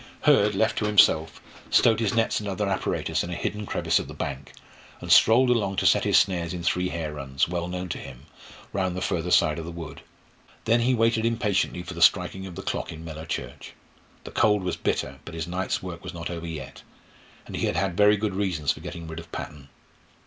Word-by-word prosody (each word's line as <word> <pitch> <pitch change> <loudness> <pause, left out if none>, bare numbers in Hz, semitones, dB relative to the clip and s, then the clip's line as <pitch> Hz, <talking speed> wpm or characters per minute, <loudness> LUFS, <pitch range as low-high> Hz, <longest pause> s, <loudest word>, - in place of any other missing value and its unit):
Hurd, 105 0 +4
left 110 +3 +1
to 105 - -1
himself, 80 -7 +4 0.3
stowed 110 -2 +4
his 110 -2 0
nets 115 -1 +1
and 105 -1 -5
other 100 +1 -2
apparatus 95 -2 -1
in 85 - -5
a 90 - -3
hidden 105 +4 -3
crevice - - +1
of - - -6
the - - -9
bank, 70 -1 -5 0.5
and - - -5
strolled 125 +3 +6
along 100 -5 +1
to - - -1
set - - +4
his - - +4
snares 90 -2 +1
in 85 - -6
three 90 +1 +1
hare 80 -2 -4
runs, 70 -2 -1
well 85 0 -3
known 90 +1 -4
to - - -4
him, 65 - -11 0.5
round 95 -2 -1
the - - -3
further 90 -1 -1
side 85 -3 +3
of 80 - -6
the 85 - -6
wood. 80 -4 -8 0.6
Then 115 +2 +3
he 125 +2 +2
waited 115 0 +2
impatiently 110 -6 0
for 90 - -7
the 85 - -7
striking 90 +2 +3
of 90 - -9
the 95 - -7
clock - - -3
in 80 +1 -9
Mellor 80 0 -8
church. - - -6 0.5
The - - -9
cold 105 -2 +2
was 90 - -1
bitter, 65 0 -2
but 85 - -9
his 80 -1 -3
night's 90 +2 -2
work 85 -2 -7
was - - -7
not 85 +1 -5
over 85 -1 -5
yet, 70 -5 -7 0.6
and - - -8
he - - 0
had - - -1
had 95 -1 0
very 105 +2 +5
good 105 -1 -2
reasons 90 -7 0
for - - -6
getting 85 -2 -7
rid 80 +1 -6
of 85 -1 -12
Patton. 70 -2 -7
90 Hz, 225 wpm, -25 LUFS, 80-105 Hz, 0.6 s, strolled